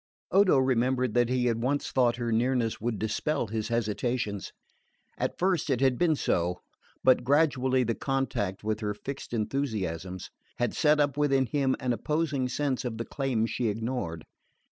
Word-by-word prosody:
Odo 195 -6 +5
remembered 130 -2 +1
that 120 -1 +3
he 125 -1 +1
had 115 -1 +1
once 140 +4 -1
thought 120 -2 +3
her 120 -1 -2
nearness 120 -1 +1
would 115 -1 -1
dispel 110 +6 -1
his 110 0 -3
hesitations. 115 -2 -2 0.6
At - - -2
first 180 -4 +1
it 130 -3 +1
had 130 -2 +2
been 170 -3 +3
so; 90 -8 0 0.4
but 130 -1 +5
gradually 130 -2 +3
the 115 -1 0
contact 120 -8 -2
with 110 0 -1
her 105 -2 -2
fixed 140 +5 -7
enthusiasms 105 - -3 0.3
had 120 - 0
set 150 -1 +3
up 145 -2 +1
within 135 -3 +3
him 135 +1 +1
an 125 -1 0
opposing 140 +1 -1
sense 135 0 -1
of 120 -3 -4
the 115 - -3
claims 120 -5 -1
ignored. 110 -7 -2
125 Hz, 160 wpm, -28 LUFS, 110-135 Hz, 0.6 s, Odo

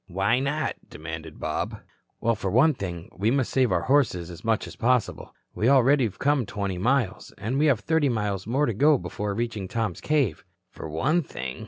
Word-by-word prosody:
"Why 100 +6 +1
not?" 145 +3 -1
demanded 80 0 -8
Bob. - - -3 0.4
"Well, 115 - +2
for 100 -3 -3
one 135 - +4
thing, 90 -8 -6
we 105 +4 +1
must 130 0 +1
save 130 -2 +2
our - - +1
horses 110 -11 +1
as 85 +1 -11
much 110 -1 +1
as - - -10
possible. 125 0 0 0.2
We 115 - +1
already 135 0 +5
have 105 - -5
come 140 -5 +1
twenty 100 -3 -3
miles, 120 -1 0
and 125 +6 -2
we 155 - +4
have 130 -7 +3
thirty 160 +2 +2
miles 105 -4 -2
more 135 +6 +2
to 115 - -1
go 145 +7 +4
before 105 -4 -4
reaching 115 -4 -3
Tom's 110 -4 -2
cave." 145 -8 0 0.3
"For 80 - -8
one 145 - +1
thing?" 65 - -6
115 Hz, 195 wpm, -26 LUFS, 95-135 Hz, 0.4 s, already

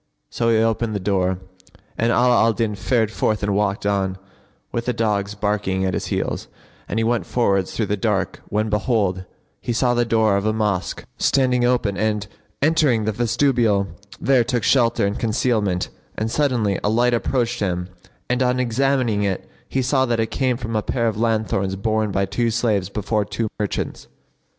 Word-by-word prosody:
So 115 -1 0
he 115 - +4
opened 115 0 +1
the - - 0
door, 95 -1 0 0.6
and 115 +1 +1
Ala 125 +1 +4
al 115 0 +4
Din 110 -1 -1
fared 110 +2 0
forth 110 -2 0
and 100 0 +1
walked 100 -1 0
on, 95 -2 0 0.5
with 115 0 -2
the 125 - 0
dogs 105 -3 -1
barking 100 -2 -1
at 95 - 0
his - - -2
heels, - - -2 0.4
and - - -2
he - - +1
went 115 0 0
forwards 100 -6 +1
through 110 - 0
the 105 - 0
dark - - -1
when 110 +1 0
behold, 105 -4 0 0.4
he - - -3
saw 120 +1 +2
the 120 0 +2
door 110 -3 +2
of 100 - -2
a 110 - +2
mosque 105 -4 -1
standing 125 -3 +2
open 120 -5 +1
and, 105 -1 0 0.4
entering 145 -8 +3
the 110 - +1
vestibule, 115 -3 +1 0.3
there 130 -3 +3
took 120 -1 -1
shelter 120 -4 +3
and 100 +1 -2
concealment; 110 -5 0 0.3
and 110 +1 -1
suddenly 120 -9 +1
a 105 - +2
light 120 +3 +3
approached 120 0 0
him 90 -3 -1 0.4
and 125 +1 0
on 125 0 +2
examining 125 -2 +1
it 100 -2 -2 0.2
he 135 - 0
saw 130 +1 +2
that 115 -1 0
it 110 - -1
came 130 -3 0
from 115 -2 -4
a 110 - +2
pair 115 +2 -1
of 110 - 0
lanthorns 110 -4 0
borne 110 +2 0
by 100 0 +1
two 115 +4 0
slaves 110 -5 0
before 105 +1 -1
two 105 +2 -3
merchants. 105 -2 -3
110 Hz, 185 wpm, -21 LUFS, 100-120 Hz, 0.6 s, he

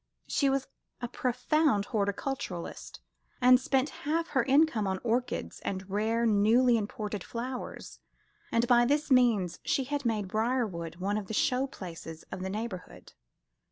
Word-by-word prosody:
She 280 - +1
was 270 0 0 0.3
a 245 - -3
profound 250 -1 +1
horticulturist, 200 - -3 0.4
and 250 0 +7
spent 265 +2 +1
half 330 +3 -1
her 265 - +2
income 265 -4 +3
on 190 0 0
orchids 245 +1 -1
and 190 -1 -4
rare 220 +3 +1
newly 230 +4 +4
imported 210 -2 -3
flowers, 250 +2 -6 0.5
and 230 +1 +2
by 240 0 +6
this 290 +4 +1
means 230 -9 +3
she 270 - +1
had 285 +2 -3
made 215 -5 0
Briarwood 215 -6 -1
one 195 +4 -1
of 200 - -8
the 220 - -4
show 255 +4 +2
places 165 - -9
of 185 - -5
the 190 - -3
neighbourhood. 190 - -6
230 Hz, 145 wpm, -30 LUFS, 200-260 Hz, 0.5 s, and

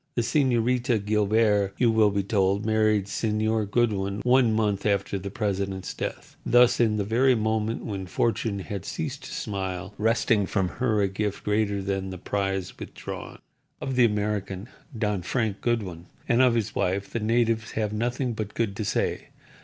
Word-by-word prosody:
The 120 - +1
Señorita 120 -3 +1
Guilbert, 105 -1 +2
you 120 -2 +4
will 110 -2 +4
be 100 -1 0
told, 100 +1 +1
married 110 -2 +2
Señor 110 0 0
Goodwin 100 -3 0
one 125 -2 +4
month 105 -3 0
after 100 -1 0
the 100 +1 -5
president's 100 -2 -2
death, - - -6
thus, 125 0 +5
in 110 -3 +3
the 105 - 0
very 125 +5 +3
moment 110 0 -1
when 95 -3 -4
Fortune 110 +1 0
had 100 -1 -5
ceased 145 -4 -4
to - - -8
smile, 95 -2 -4
wresting 110 -2 +2
from 95 -4 0
her 110 -2 0
a - - +3
gift 100 +1 -3
greater 105 -1 0
than 95 -1 -2
the 95 - -6
prize 95 0 -2
withdrawn. - - -7 0.4
Of 135 - -3
the 125 -1 +6
American, 105 -1 -2 0.3
Don 105 -3 0
Frank 110 +1 -1
Goodwin, 95 -8 -2 0.2
and 120 +2 +4
of 125 -2 +4
his 115 -3 -1
wife 95 +2 -1
the 115 - -2
natives 115 0 +1
have 110 -1 -1
nothing 120 +3 -1
but 110 -1 -5
good 110 -4 -1
to 110 - -2
say. - - -1
105 Hz, 170 wpm, -26 LUFS, 100-115 Hz, 0.4 s, the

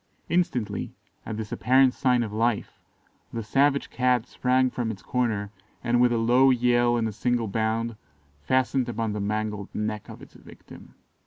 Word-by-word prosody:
Instantly, 170 -11 -1 0.3
at 110 - -4
this 110 -2 -6
apparent 130 +1 +4
sign 125 -2 +2
of 105 -2 -6
life, 115 0 -1 0.5
the 115 - -4
savage 140 +5 +1
Cat 125 -2 +1
sprang 130 0 +1
from 120 -2 -2
its 100 -3 -7
corner, 110 -5 -1 0.3
and, 120 0 +2
with 125 -1 +4
a 120 - +1
low 125 +4 +4
yell 120 -1 +3
and 115 -1 0
a - - -3
single 120 +2 -1
bound, 110 +2 -1 0.5
fastened 130 - +1
upon 115 -2 -2
the 105 - -3
mangled 105 0 -3
neck 105 -1 -3
of - - -10
its - - -15
victim. - - -15
120 Hz, 165 wpm, -26 LUFS, 110-125 Hz, 0.5 s, apparent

